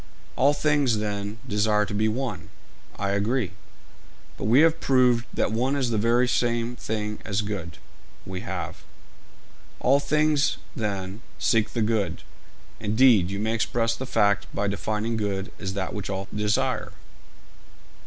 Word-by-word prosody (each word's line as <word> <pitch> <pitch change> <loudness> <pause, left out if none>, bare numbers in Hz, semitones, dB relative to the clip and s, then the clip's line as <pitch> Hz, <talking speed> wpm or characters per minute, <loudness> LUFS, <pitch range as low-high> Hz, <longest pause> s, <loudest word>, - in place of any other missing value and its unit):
'All 140 +3 +4
things, 145 -5 +2
then, 105 0 -3
desire 105 -1 +2
to 105 - -6
be 110 +1 +2
one.' 125 +4 -3 0.5
'I 100 - -1
agree.' 105 +2 0 0.8
'But - - -5
we 120 +7 +6
have 165 0 +4
proved 125 -3 +3
that - - 0
one 125 +5 +1
is 130 -4 0
the 110 - +1
very 120 +3 +3
same 120 -1 0
thing 105 -2 -3
as 105 0 -1
good.' 100 -6 -5 0.5
'We 95 -1 -5
have.' - - -5 1.0
'All 135 +3 +4
things, 150 0 +2 0.2
then, 100 -3 -3 0.2
seek 110 -2 +1
the 115 - +1
good; 105 -6 -1 0.6
indeed, 110 -4 +4
you 100 - -3
may 110 +2 -1
express 115 0 0
the 130 - -6
fact 100 -5 +2
by 100 - 0
defining 110 +3 -1
good 100 -2 -2
as 95 -2 -4
that 95 -2 -3
which 105 -2 -5
all 95 0 -3
desire.' 105 0 0
110 Hz, 145 wpm, -25 LUFS, 100-125 Hz, 1.0 s, we